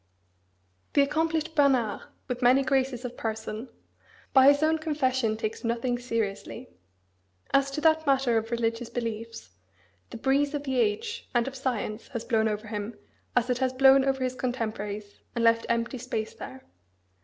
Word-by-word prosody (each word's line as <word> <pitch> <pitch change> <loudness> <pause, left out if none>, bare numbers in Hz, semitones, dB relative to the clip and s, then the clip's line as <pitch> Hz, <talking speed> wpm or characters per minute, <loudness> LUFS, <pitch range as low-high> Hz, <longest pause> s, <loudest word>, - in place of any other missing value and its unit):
The 285 - +5
accomplished 320 +2 0
Bernard, 265 -8 +2 0.3
with 250 0 -4
many 255 +3 +5
graces 260 -2 0
of 245 0 -5
person, 220 +2 -4 0.6
by 265 0 +7
his 285 +1 +5
own 320 +1 +3
confession, 260 -8 0
takes 220 -1 -4
nothing 240 +1 -1
seriously. 230 0 -3 0.8
As 275 0 +4
to 275 +2 -4
that 315 -1 +3
matter 265 -3 +3
of 225 0 0
religious 230 0 -1
beliefs, 230 - -5 0.6
"the - - -7
breeze 280 +4 +1
of 290 - -3
the 265 -3 -1
age, 445 - -1
and 240 +1 +2
of 270 - -5
science, 240 -4 -3
has 230 -2 -4
blown 220 -1 +2
over 210 +1 -3
him, 210 +1 -5 0.4
as 245 0 +2
it 250 - 0
has 260 -1 +1
blown 270 +1 +6
over 270 -1 0
his 255 0 -1
contemporaries, 215 -5 -4 0.2
and 235 - 0
left 230 0 +3
empty 235 +2 -1
space 220 -1 -3
there." 130 +1 -9
250 Hz, 160 wpm, -27 LUFS, 225-275 Hz, 0.8 s, by